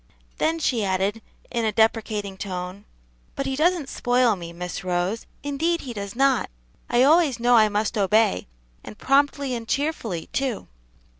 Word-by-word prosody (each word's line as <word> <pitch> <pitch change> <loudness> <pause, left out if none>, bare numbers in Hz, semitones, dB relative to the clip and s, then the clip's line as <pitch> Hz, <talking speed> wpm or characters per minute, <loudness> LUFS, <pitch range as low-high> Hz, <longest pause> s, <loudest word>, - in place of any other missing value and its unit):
Then 325 +1 +1
she 250 -8 0
added, 195 +3 0 0.3
in 235 -2 -1
a 220 - +1
deprecating 215 -2 0
tone, 185 0 -6 0.5
"But 275 - -3
he 270 0 -1
doesn't 330 0 +1
spoil 245 -3 +2
me, 170 -2 -8
Miss 180 +2 -6
Rose; 180 +4 -1 0.2
indeed 320 +4 0
he 250 - -6
does 200 -1 -6
not. 270 -1 +2 0.4
I 240 +1 +4
always 300 -3 +4
know 245 +1 +4
I 215 -2 +6
must 210 +2 -1
obey, 200 - +2 0.4
and 215 - -10
promptly 280 0 +2
and 230 -2 -5
cheerfully, 260 - -2
too." 265 -5 -2
230 Hz, 155 wpm, -24 LUFS, 200-275 Hz, 0.5 s, I